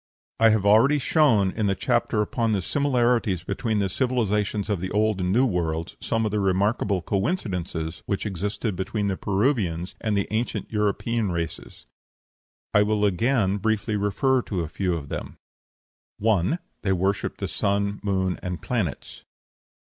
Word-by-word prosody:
I 115 0 +6
have 110 -2 +2
already 115 +8 +5
shown, 135 - +3
in 110 0 -1
the 100 - +1
chapter 120 0 +1
upon 115 +1 0
the 95 -3 0
similarities 120 - +1
between 110 +2 -1
the 100 -1 +1
civilizations 105 -3 0
of 105 -4 -1
the 95 +2 -3
Old 105 -1 +1
and 90 0 0
New 125 +6 +4
Worlds, 85 -6 -2
some 115 0 0
of 105 - -1
the 105 - 0
remarkable 100 0 +1
coincidences 95 - -2
which 100 +1 -1
existed 105 +2 -2
between 100 +3 -2
the 95 - 0
Peruvians 95 - 0
and 110 -3 0
the 100 - 0
ancient 110 +2 -2
European 105 0 0
races; 85 -2 -5 0.9
I 105 - +6
will 105 0 +2
again 105 0 +2
briefly, 110 +1 0
refer 115 +6 +1
to 95 -6 -3
a 80 - -3
few 90 +2 -1
of 70 -4 -6
them: - - -6 0.8
1. 110 - +2 0.2
They 95 -2 +1
worshipped 95 +2 -1
the - - -2
sun, 100 0 -1
moon, 95 -3 0
and 90 -1 -4
planets. 105 - -3
105 Hz, 155 wpm, -25 LUFS, 95-115 Hz, 0.9 s, I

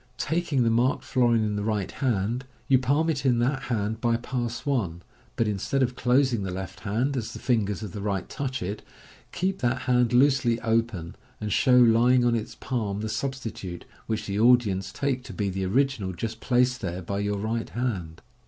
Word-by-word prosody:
Taking 160 -4 0
the 115 - +2
marked 120 +4 +2
florin 120 -3 +2
in 105 -1 -1
the 105 - -2
right 105 -3 -1
hand, 120 0 -1 0.2
you 130 -2 +5
palm 140 +5 +1
it 150 -4 -1
in 125 -3 +3
that 130 +3 +1
hand 110 -1 -2
by 115 -1 +2
Pass 120 -1 -3
i, 125 -10 +1 0.5
but 115 - +1
instead 105 +7 0
of 125 0 -1
closing 125 -2 +2
the 95 - -3
left 95 -1 -6
hand 115 +9 -1
as 115 -4 -3
the - - -7
fingers 110 -4 0
of 105 - -6
the 100 - -6
right 100 -2 -2
touch 130 -6 -4
it, 100 +4 -4 0.5
keep 190 +1 -1
that 125 0 0
hand 125 -2 +2
loosely 125 -2 +3
open, 110 -7 -1 0.2
and 105 -2 -2
show 125 -1 +4
lying 120 +1 +5
on 120 - +3
its 110 -2 -3
palm 105 -6 -3
the 110 - -3
substitute, 110 -6 -4 0.2
which 110 -1 -2
the 100 +1 -2
audience 105 -6 +3
take 135 0 -1
to - - -8
be 100 -2 -1
the 95 0 -2
original 115 -4 +1
just 110 +5 -5
placed 125 +1 +2
there 90 -2 -4
by 100 +3 -3
your 100 0 -1
right 110 +3 -2
hand. 95 -10 -3
115 Hz, 195 wpm, -26 LUFS, 100-130 Hz, 0.5 s, you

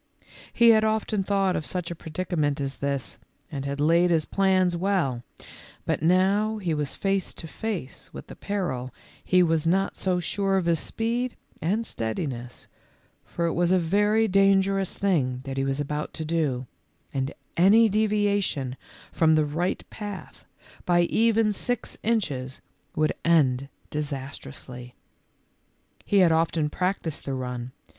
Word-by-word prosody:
He 235 0 +5
had 220 -1 +6
often 220 -1 0
thought 195 -1 +1
of - - -2
such 175 +1 -4
a - - -4
predicament 160 -3 -2
as 140 -1 -3
this 140 -2 -3 0.3
and 140 -2 -4
had 140 0 -3
laid 170 +4 +4
his 160 -3 +2
plans 185 -2 +2
well, 170 -9 0 0.6
but - - -1
now 195 +6 +3
he 180 -6 -1
was 150 -2 -2
face 195 -1 -1
to 165 - -8
face 175 -3 -5
with - - -9
the - - -11
peril 155 -11 -3 0.3
he 180 0 +4
was 165 -1 +1
not 195 +3 +1
so 185 -2 0
sure 195 +2 0
of 185 - 0
his 170 -2 +2
speed 235 +6 -2 0.3
and 205 +8 0
steadiness, 120 - -4 0.6
for 170 - -3
it 165 - 0
was 175 +1 +2
a 185 - +5
very 205 +6 +2
dangerous 195 -1 +2
thing 135 -11 +1
that 135 0 -5
he 135 - +1
was 135 +1 -1
about 150 +1 -3
to 160 - -4
do, 150 -6 0 0.5
and 135 +1 -1 0.2
any 210 +6 +6
deviation 205 - 0 0.3
from 160 -1 +4
the 155 -1 +3
right 165 +5 -2
path 205 -3 -8 0.4
by 175 -1 +3
even 225 +3 +2
six 245 +3 -3
inches 145 - -1 0.4
would 155 0 +2
end 140 -5 +3 0.2
disastrously. 135 -4 -6 1.1
He 205 - +2
had 175 -3 +5
often 160 -2 +1
practised 180 -4 -2
the 135 - -2
run. 125 -1 -4
170 Hz, 150 wpm, -26 LUFS, 145-195 Hz, 1.1 s, had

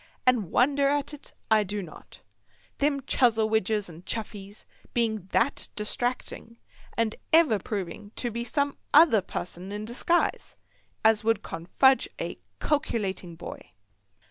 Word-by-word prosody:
And 240 -8 +3
wonder 275 +5 +3
at 290 +1 0
it 295 - -11 0.2
I 215 -1 +6
do 205 0 -3
not, 165 - -13 0.6
them 280 -1 +1
Chuzzlewidges 220 -5 +2
and 170 0 -12
Chuffeys 205 -1 -6 0.3
being 220 -5 0
that 235 +7 0
distracting, 230 +1 -3 0.4
and 230 -1 +1 0.2
ever 315 -10 +5
proving 205 +1 -5
to 240 - -2
be 235 +2 -3
some 280 +4 -1 0.2
other 295 -9 +7
pusson 180 +1 -6
in 210 +1 -4
disguise, 260 +9 0 0.5
as 220 -1 +5
would 225 +1 +1
confuge 265 +11 +2
a - - -4 0.2
calkilating 195 - -1
boy. - - -9
220 Hz, 125 wpm, -27 LUFS, 205-265 Hz, 0.6 s, other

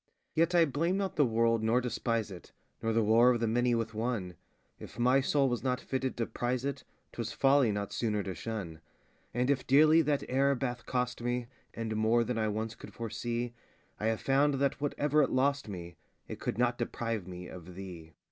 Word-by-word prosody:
Yet 165 +2 +2
I 170 -1 +6
blame 165 +6 0
not 195 -1 -2
the 145 -3 +4
world, 115 0 +2
nor 115 +3 +3
despise 115 -3 -1
it, 90 - -11 0.3
Nor 115 - 0
the 115 0 +2
war 115 +3 +5
of 120 -2 +2
the 115 - +1
many 120 +2 +2
with 115 0 -1
oneŌĆö 110 -5 -2 0.5
If - - -11
my 125 +3 +4
soul 140 0 +2
was 120 -2 -1
not 125 -1 0
fitted 130 0 -3
to 115 - 0
prize 125 +3 -2
it, 140 -1 -3 0.3
ŌĆÖTwas 115 0 -4
folly 135 -4 +4
not 100 -1 -3
sooner 105 -3 0
to 95 - -4
shun: 90 -8 -6 0.5
And 125 +3 +1
if 135 -2 -1
dearly 155 +4 +6
that 145 -2 0
error 140 +2 +2
bath 125 -2 -4
cost 125 -2 -1
me, 120 0 -1 0.3
And 110 -1 -3
more 110 +2 +3
than 115 0 -2
I 110 - +1
once 110 +1 -2
could 115 - -12
foresee, 120 +1 -3 0.5
I 110 - -1
have 110 -1 0
found 140 +1 +3
that 140 0 0
whatever 145 +1 +2
it 140 - +2
lost 140 -1 +1
me, 85 -4 -7 0.3
It - - -7
could - - -3
not 120 0 +1
deprive 115 -4 -3
me 90 0 -8
of 90 -3 -10
_thee. 90 -3 -9
120 Hz, 205 wpm, -31 LUFS, 110-135 Hz, 0.5 s, I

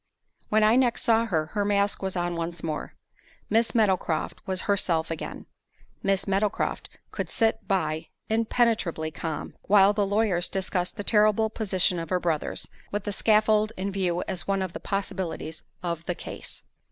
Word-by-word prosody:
When 215 0 +4
I 220 +3 +5
next 245 -2 +2
saw 230 0 +3
her, 160 -7 +1
her 205 - +1
mask 200 0 +1
was 190 -1 -2
on 175 -1 -1
once 170 0 -4
more. 155 -2 -4 0.6
Miss 225 +3 +2
Meadowcroft 190 -7 +1
was 185 -1 0
herself 175 -5 +1
again. 165 - -5 0.6
Miss 195 -1 +1
Meadowcroft 200 +2 0 0.2
could - - -3
sit 225 -1 0
by, 165 -5 0 0.2
impenetrably 220 -8 +1
calm, 155 -1 -4
while 200 0 +6
the 205 -1 +1
lawyers 200 -4 +1
discussed 185 -1 -1
the 205 - -3
terrible 215 +1 +3
position 190 -5 +1
of 165 -1 -5
her 185 - +2
brothers, 165 -4 -1 0.2
with 205 -1 -2
the 205 - -2
scaffold 215 +1 +3
in 195 +2 -2
view 180 -3 0
as 180 -2 -3
one 195 -1 +1
of 185 -2 -5
the - - -5
possibilities 190 -5 -3 0.2
of 170 -2 -2
the 180 - -1
"case." - - -7
195 Hz, 165 wpm, -27 LUFS, 175-215 Hz, 0.6 s, while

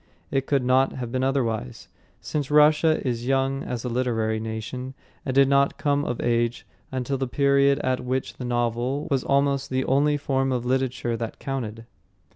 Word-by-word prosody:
It 135 0 0
could 140 -3 +1
not 130 +2 +3
have 120 -3 -5
been 130 0 -1
otherwise, 120 - -1 0.3
since 145 -3 -3
Russia 150 +2 +5
is 120 0 -2
young 135 0 +1
as 125 0 -5
a - - -1
literary 115 -3 0
nation, 110 +4 -5 0.3
and 130 - -1
did 135 0 +6
not 140 0 +2
come 145 -1 +1
of 120 - -3
age 120 0 0 0.3
until 130 +1 -2
the 135 - -1
period 140 +1 +3
at 130 -1 0
which 130 +1 -2
the - - -6
novel 120 +3 -1
was 135 -2 +1
almost 140 0 +1
the 130 0 -1
only 145 +2 +2
form 135 -2 0
of 125 -1 -1
literature 130 -2 0
that 115 -1 -5
counted. 115 -5 -5
130 Hz, 175 wpm, -24 LUFS, 120-140 Hz, 0.3 s, did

